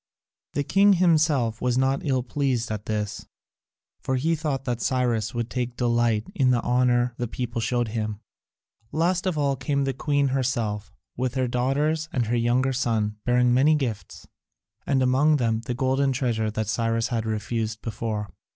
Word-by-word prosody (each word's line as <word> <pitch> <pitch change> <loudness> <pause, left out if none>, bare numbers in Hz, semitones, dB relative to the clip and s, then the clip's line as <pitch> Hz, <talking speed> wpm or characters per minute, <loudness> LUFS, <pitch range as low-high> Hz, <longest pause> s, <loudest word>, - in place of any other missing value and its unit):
The 145 - 0
king 200 +6 +4
himself 155 - +2
was 125 0 +1
not 135 +1 +1
ill 130 -4 0
pleased 125 -3 -1
at 105 -1 -5
this, 105 -1 -3 0.7
for 130 - -2
he 155 +6 +1
thought 145 -4 -3
that 120 -2 -2
Cyrus 120 -4 0
would 120 -1 -1
take 125 -1 -3
delight 120 -2 +1
in 130 -3 +2
the 120 -2 +2
honour 125 0 +2
the 120 - -2
people 120 0 -4
showed 120 +1 0
him. 110 -2 -3 0.7
Last 175 +3 +1
of 180 -4 -1
all 140 -2 +1
came 140 +1 -1
the 135 0 -1
queen 140 +1 +1
herself, 120 -6 -1 0.2
with 130 +1 -2
her 130 -1 +1
daughters 145 +6 0
and 120 -3 0
her 115 +2 0
younger 120 +3 +2
son, 110 -5 0
bearing 125 0 +3
many 145 +5 +4
gifts, 115 -11 -4 0.6
and 135 -2 +2
among 140 +4 +3
them 115 -3 0
the 120 - -2
golden 135 +1 +1
treasure 115 -4 0
that 110 0 -3
Cyrus 115 +1 0
had 115 -3 -2
refused 110 0 -3
before. 110 -3 -4
125 Hz, 170 wpm, -25 LUFS, 115-135 Hz, 0.7 s, king